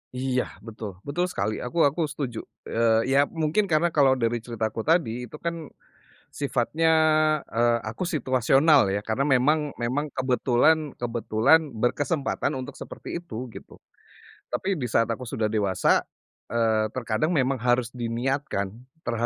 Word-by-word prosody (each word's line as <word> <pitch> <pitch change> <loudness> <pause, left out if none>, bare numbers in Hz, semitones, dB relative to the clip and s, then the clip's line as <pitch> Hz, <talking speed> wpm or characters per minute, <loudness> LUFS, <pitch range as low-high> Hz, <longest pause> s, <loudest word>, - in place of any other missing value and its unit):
Iya 130 0 0 0.2
betul, 110 -1 -7
betul 160 +5 -1
sekali 110 -11 -2
aku 145 +7 0
aku 145 +4 +2
setuju, 135 -6 -4 0.2
eee, 115 +2 +1
ya 135 - +4
mungkin 165 +5 0
karena 165 +1 +2
kalau 135 -4 +4
dari 120 -1 0
ceritaku 115 -1 -4
tadi 125 -8 +1
itu 135 - -11
kan 165 -1 -5 0.7
sifatnya, 145 +4 0 0.6
eee, 120 +1 +1
aku 110 +9 -5
situasional 135 - +3
ya 100 +2 -2
karena 115 +5 0
memang 145 +3 +2
memang 130 +6 -2
kebetulan 130 +4 +2
kebetulan 120 +5 +2 0.2
berkesempatan 135 +5 -1
untuk 130 +2 -6
seperti 155 +5 -7
itu 125 -7 -7
gitu. - - -12 0.7
Tapi 190 -5 -2
di 125 - -2
saat 115 +1 +2
aku 125 +1 -6
sudah 110 - -2
dewasa, 100 -3 +2 0.5
eee, 110 -2 +1
terkadang 125 +8 -1
memang 130 -1 +1
harus 120 0 +1
diniatkan, 120 -3 -2 0.3
ter - - -2
125 Hz, 135 wpm, -25 LUFS, 115-150 Hz, 0.7 s, ya